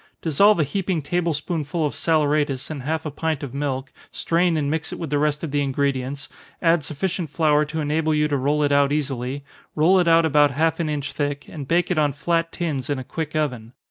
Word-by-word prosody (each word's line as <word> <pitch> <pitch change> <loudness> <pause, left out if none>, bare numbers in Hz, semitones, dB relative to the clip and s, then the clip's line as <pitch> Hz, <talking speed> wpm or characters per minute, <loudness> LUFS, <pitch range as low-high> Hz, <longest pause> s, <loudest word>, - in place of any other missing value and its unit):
Dissolve 200 +6 +4
a - - +4
heaping 180 +1 -2
table 175 +3 0
spoonful 155 +1 -2
of 145 - -2
saleratus 150 -4 +1
in 150 - -5
half 155 +4 -3
a 155 - -3
pint 155 0 -2
of 135 -3 -6
milk, 135 -1 -3 0.2
strain 170 0 +1
and 145 -2 0
mix 160 0 -2
it - - -5
with 160 -4 -5
the 145 - +2
rest 150 +1 0
of 160 - -3
the 145 0 +1
ingredients, 140 0 -1 0.3
add 165 -2 +3
sufficient 170 +3 -3
flour 150 0 +2
to 155 +2 -4
enable 155 +1 0
you 150 0 +2
to 145 - -1
roll 145 +3 +1
it 145 - +1
out 140 0 +3
easily, 140 -2 -2 0.3
roll 175 +5 +4
it 175 - +2
out 165 0 +5
about 145 -1 +4
half 160 +6 0
an 165 -2 -1
inch 145 -1 -3
thick, 145 -1 -2
and 145 -4 -8
bake 175 +4 +1
it 170 - +1
on 145 -2 +2
flat 165 +3 0
tins 150 -7 -3
in 145 - 0
a 130 - -5
quick 155 +3 -5
oven. 125 -7 -2
150 Hz, 225 wpm, -23 LUFS, 140-165 Hz, 0.3 s, out